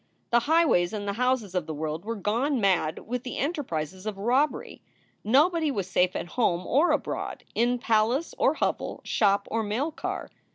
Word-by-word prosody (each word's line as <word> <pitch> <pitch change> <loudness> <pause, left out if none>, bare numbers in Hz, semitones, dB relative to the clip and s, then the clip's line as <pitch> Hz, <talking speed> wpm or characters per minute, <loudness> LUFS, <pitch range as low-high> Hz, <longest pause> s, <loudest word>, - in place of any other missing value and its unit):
The 240 - +5
highways 315 - +3
and 205 -1 -4
the 200 - -1
houses 250 -4 0
of 180 -4 -1
the 160 - -4
world 155 +3 -4
were 230 +1 -3
gone 240 +7 0
mad 185 -6 +1
with 250 +1 -3
the 250 - -6
enterprises 190 - -3
of 210 -2 -3
robbery. 250 +9 0 0.4
Nobody 310 - +3
was 200 -9 -2
safe 180 0 +1
at - - -2
home 180 -7 0
or 300 +7 +3
abroad, 300 - -2
in 240 +2 +2
palace 235 +6 +1
or - - +3
hovel, - - -2
shop 200 -2 +2
or 225 - +1
mail 225 +9 -1
car. - - -5
225 Hz, 175 wpm, -27 LUFS, 190-265 Hz, 0.4 s, The